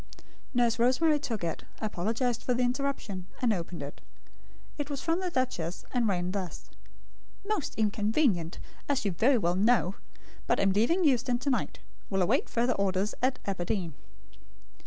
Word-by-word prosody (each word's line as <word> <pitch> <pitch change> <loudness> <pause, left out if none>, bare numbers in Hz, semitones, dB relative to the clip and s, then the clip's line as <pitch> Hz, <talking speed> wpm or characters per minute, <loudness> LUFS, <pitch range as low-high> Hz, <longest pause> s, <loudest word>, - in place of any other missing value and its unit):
Nurse 240 -1 +3
Rosemary 295 +6 +4
took 230 -9 -3
it; 165 -1 -2 0.2
apologised 225 +4 -1
for 250 - +1
the 250 - +1
interruption, 245 -8 -2
and 240 -3 +3
opened 170 -4 -4
it. 140 - -8 0.8
It 290 0 -2
was 285 -2 -3
from 335 +2 0
the 370 -1 -1
duchess, 245 - -2
and 245 -3 +2
ran 180 -2 0
thus: 190 -4 -5 0.7
MOST 420 -7 -1
INCONVENIENT, 210 - +1 0.3
AS 275 -6 +1
YOU 200 - +2
VERY 245 +10 +4
WELL 175 -5 +1
KNOW; 200 0 +3 0.5
BUT - - +2
AM 195 0 +4
LEAVING 235 - +3
EUSTON 255 -4 +3
TO 275 +3 -1
NIGHT. 255 - -2 0.3
WILL 195 -2 +2
AWAIT 175 - +1
FURTHER 240 +2 +2
ORDERS 195 +1 0
AT 255 +1 +2
ABERDEEN. 180 -3 -2
230 Hz, 155 wpm, -29 LUFS, 190-255 Hz, 0.8 s, Rosemary